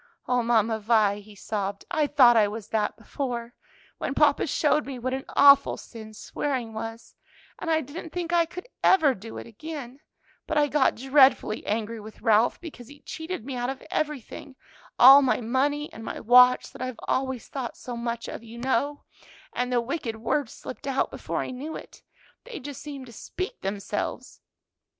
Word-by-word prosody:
"O 250 -1 +2
Mamma 225 -1 +2
Vi," 210 -2 +2
he 205 0 -15
sobbed, 200 -1 -4
"I 310 -4 +2
thought 255 -5 +6
I 215 -2 +5
was 210 0 -7
that 215 -2 -1
before, 240 0 -5 0.5
when 275 - -3
papa 295 0 +3
showed 300 +1 +1
me 270 -2 -5
what 255 +2 -3
an 265 0 -4
awful 280 0 +6
sin 220 -2 -11
swearing 250 -2 -3
was, 225 +1 -7 0.5
and 330 - -4
I 320 -1 +3
didn't 305 +5 -8
think 345 +1 -4
I 335 -1 +4
could 360 +7 -9 0.2
ever 320 -8 +5
do 225 0 -10
it - - -7
again; 270 +2 -8 0.5
but 315 - -1
I 295 -1 +3
got 275 0 +3
dreadfully 265 -4 +3
angry 220 +1 -2
with 215 +1 -12
Ralph 225 0 +3
because 285 -8 -10
he 285 +2 -15
cheated 320 -6 -6
me 270 -1 -5
out 245 0 -2
of 270 0 -6
everything 290 -2 -4 0.4
all 270 +3 +10
my 265 - +2
money 275 +5 -1
and 225 - -9
my - - -5
watch 250 +2 +6
that - - -11
I've 255 -3 -4
always 260 -2 -1
thought 260 -4 -5
so 245 - -7
much 235 0 -4
of, - - -7
you 230 0 -11
know 265 +4 -1 0.5
and 250 0 -2
the 245 - +3
wicked 235 -2 -4
words 230 +3 -1
slipped 275 - -9
out 270 -1 0
before - - -3
I - - -6
knew 280 +5 -6
it; - - -11 0.4
they 470 -4 -7
just 280 0 -8
seemed 280 -3 -8
to 235 - -13
speak 370 - -6
themselves." 195 +1 -4
255 Hz, 180 wpm, -26 LUFS, 225-285 Hz, 0.5 s, all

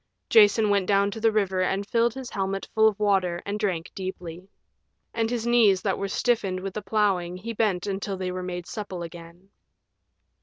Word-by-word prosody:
Jason 210 0 +5
went 200 -2 +1
down 200 0 +3
to 225 - -6
the 225 0 +4
river 195 -3 0
and 190 +2 0
filled 235 0 +1
his 260 -2 -7
helmet 195 0 -3
full 220 0 +5
of 215 -1 0
water 190 -4 +1
and 205 +1 -3
drank 185 -5 -2
deeply. 185 -1 -7 0.6
And 225 -1 0
his 235 -1 -2
knees 220 -6 +4
that 195 -2 0
were 200 - -2
stiffened 195 -3 0
with 190 0 -5
the 215 - -4
plowing 190 -4 0
he 230 +5 -6
bent 205 -5 0
until 195 -1 -3
they 185 -1 -3
were 185 0 -4
made 180 -1 -5
supple 190 -5 -6
again. 170 +2 -11
195 Hz, 190 wpm, -25 LUFS, 185-215 Hz, 0.6 s, Jason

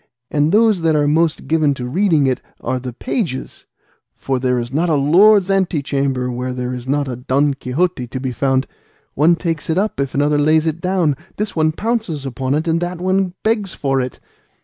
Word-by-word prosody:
And 150 +1 +2
those 215 -2 +4
that 160 -1 +2
are 145 -1 +2
most 160 +2 +1
given 155 -3 +2
to 125 - -5
reading 160 +1 +2
it 130 -1 0 0.2
are 130 +1 -2
the 125 0 -6
pages, 165 - -4 0.5
for 135 -1 -2
there 125 -1 +1
is 120 +1 -4
not 165 +4 +1
a 155 - +3
lord's 185 +8 +5
ante 185 -6 +1
chamber 135 -3 -1
where 125 +1 -3
there 125 0 -3
is 125 0 -7
not 140 +1 0
a 125 - -3
'Don 140 +3 +1
Quixote' 135 +1 -2
to 130 - -4
be 130 0 -3
found; 130 +2 +1 0.5
one 160 +5 +4
takes 165 -3 -3
it 160 - +1
up 210 -3 -1
if 140 -1 -2
another 145 +1 +2
lays 155 +2 +3
it 160 +1 -2
down; 180 -6 +1 0.2
this 210 0 -3
one 155 -1 +2
pounces 205 - -2
upon 135 +1 -2
it, 155 +3 -1
and 165 0 +2
that 175 0 -3 0.5
begs 215 -4 0
for 135 -2 0
it. 125 0 -5
145 Hz, 200 wpm, -18 LUFS, 130-170 Hz, 0.5 s, lord's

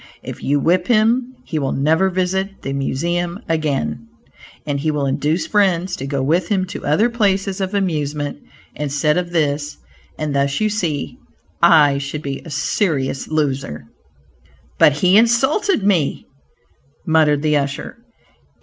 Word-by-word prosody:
If - - -8
you 145 +1 +1
whip 175 +4 +1
him, 240 +3 +2
he 160 - -3
will 135 -2 -1
never 160 +7 +2
visit 190 +2 -2
the 135 - -3
Museum 170 +6 -2
again, 155 +6 -2 0.6
and 145 -2 -2
he 155 +3 -1
will 150 -2 -1
induce 150 +5 0
friends 190 -3 +1
to 135 - -5
go 140 -1 -1
with 165 +7 +1
him 190 -3 0
to - - -7
other 155 +11 +3
places 195 -4 0
of 190 +2 -2
amusement 150 -7 -2 0.3
instead 150 +1 0
of 180 -1 -1
this, 150 -3 -1 0.4
and 155 -2 -3
thus 140 0 +1
you 215 0 +1
see, 165 -9 -3 0.4
I 155 -5 +5
should 140 +2 -5
be 140 -1 -4
a - - -10
serious 145 -3 -1
loser." 140 - -2 0.9
"But 150 - +6
he 180 +6 +4
insulted 265 - +2
me," 180 -8 +1 0.8
muttered 155 -2 +3
the 150 -1 +3
usher. 140 +6 -4
160 Hz, 145 wpm, -19 LUFS, 145-190 Hz, 0.9 s, But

